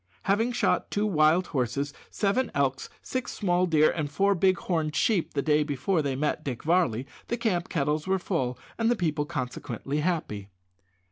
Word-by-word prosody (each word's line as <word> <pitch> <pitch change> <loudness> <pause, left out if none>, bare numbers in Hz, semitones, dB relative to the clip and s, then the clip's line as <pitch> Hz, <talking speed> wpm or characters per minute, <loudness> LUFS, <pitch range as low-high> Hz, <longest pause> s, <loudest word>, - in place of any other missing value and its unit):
Having 225 +5 +1
shot - - +1
two 205 +1 0
wild 165 -1 +4
horses, 140 +1 -2 0.2
seven 215 +6 0
elks, 135 -1 0
six 255 -1 -3
small 180 -2 +1
deer, 155 -2 +4
and 155 -4 -2
four 200 +6 +2
big 185 0 +3
horned 160 -3 -1
sheep 200 -10 +1
the 140 - +1
day 150 -1 +3
before 150 +4 0
they 140 -2 -1
met 150 +2 -1
Dick 130 -6 -4
Varley, 150 -8 +2 0.2
the 235 - -1
camp 190 -7 0
kettles 150 +1 0
were 190 0 +2
full, 135 -10 -2 0.2
and 225 0 +3
the 240 - +3
people 155 -6 -1
consequently 140 0 -3
happy. 150 - -2
160 Hz, 175 wpm, -27 LUFS, 145-190 Hz, 0.2 s, wild